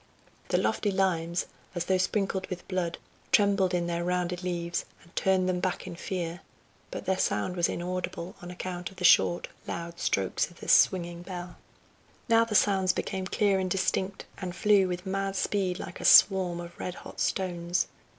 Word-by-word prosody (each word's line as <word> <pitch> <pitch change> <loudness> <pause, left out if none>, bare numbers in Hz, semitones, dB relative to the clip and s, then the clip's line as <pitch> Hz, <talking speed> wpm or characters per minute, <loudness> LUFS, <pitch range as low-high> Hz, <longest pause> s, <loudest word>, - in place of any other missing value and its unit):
The - - +1
lofty 210 - +1
limes, 175 -3 0 0.3
as 175 0 -2
though 190 0 +2
sprinkled 190 0 0
with 180 -2 -7
blood, 180 -3 -2 0.3
trembled 200 -3 +4
in 175 -1 0
their 170 0 -2
rounded 180 0 -1
leaves, 170 -1 -2 0.2
and 170 - -22
turned 190 -1 +2
them 180 -1 0
back 185 0 -2
in - - -7
fear, 175 -1 -4 0.5
but - - -6
their 190 0 0
sound 105 - 0
was 175 -1 +2
inaudible 180 0 -4
on 175 - -8
account 180 0 -5
of 190 - -16
the 180 - -6
short, 175 +1 +5 0.2
loud 170 0 -5
strokes 95 - 0
of 175 - -18
the - - -9
swinging 175 -2 +4
bell. 175 -1 -7 0.7
Now 230 -1 +5
the 220 -2 -3
sounds 190 -2 +4
became 190 -1 -3
clear 200 0 +2
and 185 -1 -1
distinct, 190 +1 -1
and 180 -2 -5
flew 205 -2 +4
with 180 +1 -4
mad 195 0 -2
speed 190 -2 0
like 180 - -7
a - - -5
swarm 185 -3 +6
of 175 0 -9
red 180 - -4
hot - - -11
stones. 175 -2 0
180 Hz, 180 wpm, -28 LUFS, 175-190 Hz, 0.7 s, swarm